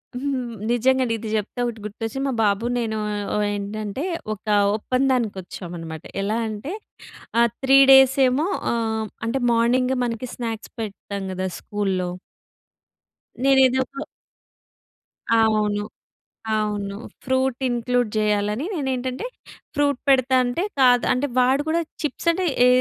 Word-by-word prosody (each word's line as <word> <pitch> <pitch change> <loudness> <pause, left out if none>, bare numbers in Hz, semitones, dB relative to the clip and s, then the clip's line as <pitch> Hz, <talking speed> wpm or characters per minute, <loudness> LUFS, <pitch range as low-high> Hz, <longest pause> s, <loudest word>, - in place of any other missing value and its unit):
హ్మ్. 255 -2 -2 0.2
నిజంగా. 255 +2 +3
ఇది 220 0 -6
చెప్తే 210 +3 -5
ఒకటి 235 -2 -4
గుర్తొచ్చింది. 225 +5 -4
మా 270 - -1
బాబు 205 +2 +1
నేను 220 -2 -1 0.4
ఓ - - +1 0.2
ఏంటంటే 205 +5 -4 0.3
ఒక 210 - -12 0.3
ఒప్పందానికి 255 -2 0
వచ్చామనమాట. 170 -3 -8 0.2
ఎలా 210 +3 0
అంటే 220 - -5 0.7
ఆహ్, 235 0 +4
3 270 +1 +6
డేస్ 265 0 +7
ఏమో 280 +6 +1 0.3
ఆహ్, 220 -1 -1 0.2
అంటే 255 +4 -1
మార్నింగ్ 250 +3 +2
మనకి 235 +1 -3
స్నాక్స్ 225 -2 -5
పెడతాం 200 -2 -5
కదా 185 0 -2
స్కూల్‌లో. 190 -3 -2 1.4
నేనేదో 265 -1 +5
ఒక 275 - -17 1.4
అవును. 215 -2 +2 0.7
అవును. 205 -2 -2 0.3
ఫ్రూట్ 260 -1 0
ఇంక్లూడ్ 245 -1 0
చేయాలని 210 +4 0
నేను 285 -6 -2
ఏంటంటే, 255 - -3 0.5
ఫ్రూట్ 285 -2 +1
పెడతా 260 -1 +4
అంటే 245 +8 -1 0.2
కాదు 245 -2 +5
అంటే 255 +3 0
వాడు 260 +3 +3
కూడా 335 +1 +2 0.2
చిప్స్ 300 +3 -3
అంటే 370 +2 -1 0.2
ఏ - - +7
240 Hz, 125 wpm, -23 LUFS, 210-260 Hz, 1.4 s, డేస్